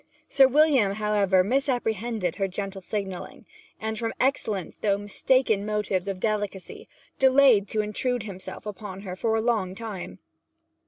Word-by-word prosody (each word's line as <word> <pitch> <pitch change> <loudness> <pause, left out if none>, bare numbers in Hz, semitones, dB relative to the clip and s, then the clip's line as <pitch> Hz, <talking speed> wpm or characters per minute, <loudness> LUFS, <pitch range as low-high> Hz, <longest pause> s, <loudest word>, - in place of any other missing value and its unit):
Sir 270 -1 +6
William, 270 -7 +4
however, 200 -3 +2
misapprehended 225 - -1
her 195 - 0
gentle 195 +1 -5
signalling, 190 -1 -5 0.3
and 220 0 -3
from 230 -1 -3
excellent, 220 -8 -1
though 200 -2 +2
mistaken 205 +1 +1
motives 210 -3 -1
of 195 -2 -3
delicacy, 205 -2 -3 0.3
delayed 265 -6 +5
to 215 +2 0
intrude 230 +3 -1
himself 190 -2 -8
upon 200 -2 -7
her 185 -3 -6
for 220 +3 0
a 220 - +1
long 215 -6 0
time. 210 -4 -7
210 Hz, 140 wpm, -26 LUFS, 195-230 Hz, 0.3 s, Sir